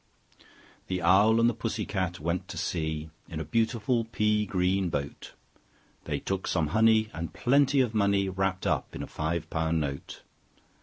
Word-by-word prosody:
The 90 -1 -2
Owl 100 +6 +5
and 115 - +5
the 120 - +2
Pussy 110 -2 -3
Cat 95 -3 -2
went 85 +3 -2
to - - -7
sea 80 -2 -3 0.2
In - - -5
a - - -4
beautiful 115 +1 0
pea 105 -2 +1
green 95 0 +1
boat: 70 -2 -5 0.7
They 75 -2 -1
took 95 +4 -3
some 80 -4 0
honey, 110 +3 +3
and 80 +1 -6
plenty 140 +2 +3
of 120 -3 0
money 100 -2 +2
Wrapped 95 0 -1
up - - -1
in - - -4
a - - -4
five 80 +1 -3
pound 80 0 0
note. 70 -2 -5
95 Hz, 165 wpm, -28 LUFS, 85-110 Hz, 0.7 s, Owl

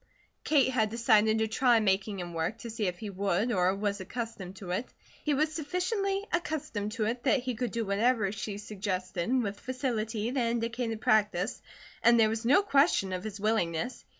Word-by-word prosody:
Kate 280 -4 +3
had 220 -4 +1
decided 220 -1 +3
to 220 0 +1
try 240 +1 +3
making 195 -1 0
him 175 -1 -6
work, 165 +7 -2
to 230 0 -7
see 215 -3 -1
if 180 -1 -3
he 210 0 -6
would, 200 +4 0
or 185 -2 +2
was 200 0 -2
accustomed 195 -3 -6
to 190 -2 -7
it. 205 +8 -2 0.3
He 295 -2 +1
was 310 +2 +1
sufficiently 390 +6 -1
accustomed 305 -11 -2
to 220 -1 -1
it 235 +3 -2
that 270 0 +3
he 250 0 -2
could 240 +1 -2
do 230 +1 -2
whatever 210 +1 +2
she 205 -1 -5
suggested 190 -2 -3
with 205 -1 -4
facility 235 -4 -2
that 250 -3 +1
indicated 230 -1 -2
practice, 210 -1 +1 0.4
and 235 0 +5
there 220 -1 +5
was 225 +1 -3
no 285 +11 +5
question 275 - +3
of 180 0 -3
his 215 -1 -6
willingness. 215 +1 -1
220 Hz, 185 wpm, -29 LUFS, 200-250 Hz, 0.4 s, and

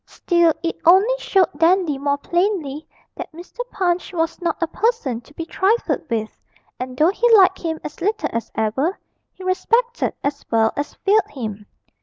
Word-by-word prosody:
Still 345 -2 +2
it 335 - -2
only 380 +8 +6
showed 385 -6 +2
Dandy 335 -4 +2
more 285 0 0
plainly 335 -3 -1 0.3
that - - -7
Mr. 345 +8 -13
Punch 360 -1 -1
was 330 +1 -2
not 340 -2 -1
a 335 - +1
person 330 - -1
to 265 - -20
be 330 - -5
trifled 395 - 0
with, 220 -2 -3 0.4
and, 255 0 -6
though 315 +4 +5
he 475 +4 +2
liked 380 -1 +4
him 320 -2 -3
as 300 +2 -8
little 420 +4 0
as 230 -1 -3
ever, 245 - 0 0.3
he 375 - -13
respected 465 +6 0
as 285 0 -2
well 225 -1 +2
as 290 +1 -4
feared 415 0 +2
him. 215 -5 -6
335 Hz, 170 wpm, -21 LUFS, 280-380 Hz, 0.4 s, only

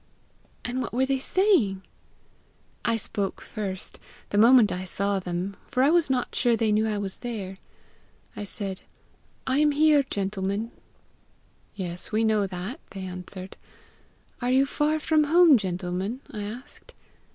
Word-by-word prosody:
"And 250 +2 -2
what 235 - -4
were 260 +1 +3
they 270 0 0
saying?" 265 - +2 1.0
"I 230 -1 +1
spoke 200 -2 -3
first 195 -3 -6 0.3
the 205 - 0
moment 230 -1 +7
I 180 - -3
saw 200 +1 -1
them, 180 +2 -4
for 260 -2 +1
I 285 - +5
was 340 -4 +3
not 255 -2 0
sure 240 -2 +3
they 225 -2 +1
knew 215 +1 +3
that 220 - 0
I - - -2
was 195 -2 -4
there. 200 -6 -5 0.8
I - - -5
said, 195 -2 -5 0.6
'I 260 +1 +1
am 300 0 +4
here, 300 0 +5
gentlemen.' 200 +2 -2 1.0
'Yes, 180 -3 -5
we 220 +1 +2
know 215 -2 +2
that,' 190 - -6
they 195 - -8
answered. 185 +1 -6 0.8
'Are 245 - 0
you 265 +2 +4
far 300 +2 0
from 310 0 +3
home, 330 0 +7
gentlemen?' 190 +3 -2
I 210 -1 -5
asked. 240 +6 -10
215 Hz, 150 wpm, -26 LUFS, 195-260 Hz, 1.0 s, moment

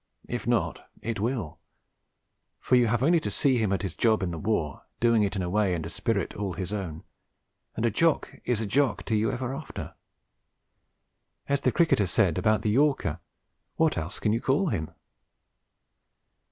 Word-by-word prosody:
If - - -4
not, - - 0
it 115 -2 -2
will; 110 - -2 1.0
for 125 - +2
you 120 -1 +5
have 120 +3 +1
only 170 +4 +4
to 160 - -3
see 135 -3 +2
him 110 -3 +1
at 100 - 0
his 95 -5 -4
job 110 -3 +2
in 90 - -1
the 85 - -5
war, 85 -9 -1 0.2
doing 115 -2 +4
it 100 -1 0
in 95 - -1
a 90 - -2
way 100 -3 +2
and 80 -2 -4
a - - -5
spirit 100 0 -1
all 100 -2 -3
his 95 +3 -4
own, 85 -6 -4 0.7
and 110 - -1
a 115 - +2
Jock 165 +9 +1
is 120 -3 0
a - - -1
Jock 135 +6 +1
to 110 - -1
you 110 +1 +1
ever 130 +1 -3
after. 140 +1 -7 1.5
As 140 0 +1
the - - +2
cricketer 155 - +3
said 90 -1 +2
about 110 -1 +2
the 105 - +1
yorker, 135 - +2 0.6
what 160 -1 +2
else 85 +4 -4
can 105 - +1
you 115 - 0
call 150 +7 +2
him? 80 - -2
110 Hz, 185 wpm, -27 LUFS, 95-130 Hz, 1.5 s, you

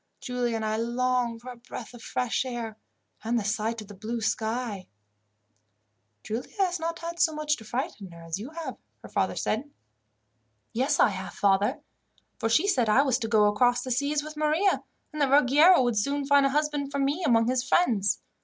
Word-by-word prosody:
Giulia 245 -2 -2
and 220 -1 -2
I 215 0 0
long 240 0 0
for 250 +2 -9
a - - -10
breath 235 0 -9
of 240 - -12
fresh 250 +1 -1
air, 240 -4 -5 0.5
and 235 +2 0
the 225 - -1
sight 220 +2 -1
of 210 - -11
the 205 - -10
blue 220 +4 -4
sky." 220 -2 -2 1.4
"Giulia 225 +3 -5
has 365 -3 +1
not 330 +1 -3
had 335 +1 -6
so 315 -2 +3
much 300 0 0
to 220 - -12
frighten 240 - -4
her 170 -1 -13
as 165 +3 -4
you 230 +6 -7
have," 315 -4 -6 0.3
her - - -10
father - - 0
said. 245 +7 -2 1.0
"Yes, 270 +5 +1
I - - +6
have, 190 -2 -6
father; 200 0 +2 0.6
for 225 -2 0
she 310 - +3
said 250 - +2
I 255 +6 +5
was 260 -3 +1
to 225 - -2
go 215 -2 +4
across 245 +4 +3
the 255 - -5
seas 285 +4 0
with 305 0 -8
Maria, 310 +6 +2 0.3
and 305 - -4
that 280 - +3
Ruggiero 290 +4 +6
would 240 -3 0
soon 280 +6 -1
find 280 0 +5
a - - 0
husband 295 -1 -1
for 280 - -2
me 280 +6 0
among 230 -6 +3
his 255 0 +1
friends. 220 - +2
250 Hz, 200 wpm, -27 LUFS, 220-290 Hz, 1.4 s, I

